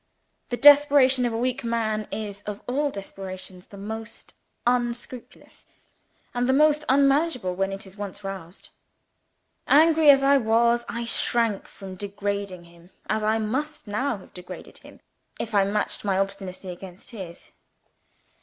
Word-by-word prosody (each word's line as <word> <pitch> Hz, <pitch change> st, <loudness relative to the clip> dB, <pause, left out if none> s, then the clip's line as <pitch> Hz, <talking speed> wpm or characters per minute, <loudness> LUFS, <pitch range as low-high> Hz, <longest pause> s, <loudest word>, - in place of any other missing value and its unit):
The 245 Hz, -, -2 dB
desperation 280 Hz, -3 st, +6 dB
of 235 Hz, -, -3 dB
a -, -, -1 dB
weak 255 Hz, +2 st, -1 dB
man 220 Hz, -2 st, -1 dB
is, 205 Hz, -2 st, -5 dB
of 210 Hz, -1 st, -5 dB
all 285 Hz, +4 st, 0 dB
desperations, 190 Hz, -3 st, -8 dB
the 200 Hz, -, -12 dB
most 220 Hz, +3 st, -7 dB, 0.3 s
unscrupulous 240 Hz, 0 st, -3 dB, 0.7 s
and 245 Hz, +1 st, 0 dB
the -, -, +4 dB
most 300 Hz, +1 st, +4 dB
unmanageable 275 Hz, -, +3 dB
when 195 Hz, +2 st, -1 dB
it 195 Hz, +1 st, -6 dB
is 190 Hz, +1 st, -13 dB
once 205 Hz, 0 st, -6 dB
roused. 190 Hz, -3 st, -8 dB, 1.0 s
Angry 315 Hz, 0 st, +6 dB
as 275 Hz, -1 st, +7 dB
I 280 Hz, +1 st, +6 dB
was, 235 Hz, 0 st, +2 dB
I 235 Hz, 0 st, -3 dB
shrank 230 Hz, -3 st, 0 dB
from 195 Hz, -1 st, -10 dB
degrading 200 Hz, -1 st, -4 dB
him, 170 Hz, 0 st, -18 dB, 0.2 s
as 215 Hz, 0 st, 0 dB
I 215 Hz, +1 st, +2 dB
must 265 Hz, +8 st, -3 dB
now 230 Hz, +4 st, -1 dB
have 190 Hz, -, -16 dB
degraded 180 Hz, -1 st, -10 dB
him, -, -, -16 dB, 0.4 s
if 225 Hz, -, -4 dB
I 200 Hz, -1 st, +4 dB
matched 210 Hz, +2 st, -2 dB
my 195 Hz, -2 st, +1 dB
obstinacy 195 Hz, -1 st, -3 dB
against 180 Hz, +3 st, -10 dB
his. 185 Hz, -7 st, -9 dB
220 Hz, 145 wpm, -25 LUFS, 195-255 Hz, 1.0 s, as